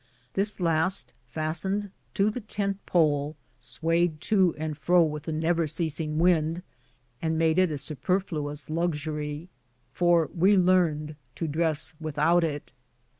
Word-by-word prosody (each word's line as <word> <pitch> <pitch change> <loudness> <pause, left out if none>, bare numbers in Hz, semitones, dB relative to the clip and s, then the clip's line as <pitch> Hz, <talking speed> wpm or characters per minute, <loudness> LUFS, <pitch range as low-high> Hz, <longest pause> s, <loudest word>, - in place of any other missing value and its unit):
This 205 +2 -1
last, 170 +2 +1
fastened 170 +8 -2 0.2
to 200 +2 +3
the 250 - -5
tent 200 -2 -3
pole, 150 -3 +2 0.2
swayed 165 -1 0
to 190 -5 +2
and 155 0 -3
fro 170 +4 +4
with 150 -1 -3
the 160 - -3
never 165 +1 +1
ceasing 155 -1 -2
wind, 165 0 +2 0.6
and 160 0 0
made 160 +1 +3
it 185 -1 +4
a 150 - -3
superfluous 150 -1 -2
luxury, 155 -1 -2 0.5
for 175 -2 +3
we 190 +3 +4
learned 165 -5 +2 0.2
to 165 - -3
dress 155 -3 0
without 160 +2 +2
it. 145 -3 -3
165 Hz, 130 wpm, -27 LUFS, 155-180 Hz, 0.6 s, fro